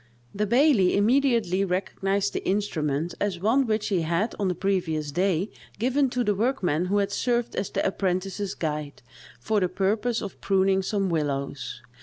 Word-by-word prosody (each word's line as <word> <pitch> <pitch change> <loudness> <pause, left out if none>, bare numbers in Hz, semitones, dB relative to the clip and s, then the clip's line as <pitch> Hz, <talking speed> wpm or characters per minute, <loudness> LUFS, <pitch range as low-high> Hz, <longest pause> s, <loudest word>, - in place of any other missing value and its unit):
The 210 +1 -1
baillie 240 -5 +4
immediately 230 -4 +2
recognised 195 +1 -1
the - - -3
instrument 165 -5 -1
as 200 -4 -1
one 235 +7 +2
which 215 0 0
he 190 -4 +1
had 170 +7 0
on 200 - +1
the 180 - 0
previous 165 -6 -1
day 185 +3 0 0.3
given 260 +5 +2
to 245 0 -1
the 210 - +2
workman 195 - 0
who 200 +3 +1
had 200 -1 +1
served 240 -1 0
as 195 - -2
the - - -1
apprentice's 195 +1 -1
guide, 150 -4 -4 0.4
for 210 - +1
the 185 -2 +1
purpose 210 +6 0
of 200 - -8
pruning 195 0 +2
some 195 0 -1
willows. 140 -4 -3
195 Hz, 165 wpm, -26 LUFS, 175-215 Hz, 0.4 s, baillie